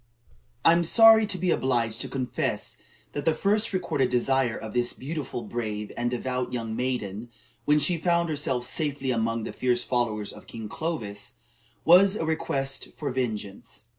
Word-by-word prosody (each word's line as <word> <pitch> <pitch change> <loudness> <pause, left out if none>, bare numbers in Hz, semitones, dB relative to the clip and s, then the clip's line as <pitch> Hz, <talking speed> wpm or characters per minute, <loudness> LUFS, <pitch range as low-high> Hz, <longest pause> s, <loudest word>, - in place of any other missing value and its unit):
I - - +8
am 170 +1 +3
sorry 225 +4 +7
to 190 - -1
be 180 0 +1
obliged 120 -4 0
to - - -2
confess 130 -2 -2 0.4
that 145 - -4
the 160 - +2
first 210 +6 +1
recorded 170 -9 0
desire 125 -1 +1
of 110 -1 -7
this 120 0 0
beautiful, 140 -4 -5
brave, 105 -2 -4
and 120 0 -1
devout 125 +1 -2
young 115 -3 -3
maiden, 120 -3 -3 0.4
when 150 0 +4
she 155 +4 +2
found 170 0 +2
herself 140 -5 -1
safely 145 -4 -2
among 115 -1 0
the - - -5
fierce 125 -1 +1
followers 110 -5 -1
of - - -14
King 110 -2 -7
Clovis, 120 -8 -4 0.5
was 190 +4 +7
a 165 - -2
request 135 -4 -2
for 145 - -3
vengeance. 115 -3 -4
130 Hz, 165 wpm, -26 LUFS, 115-160 Hz, 0.5 s, I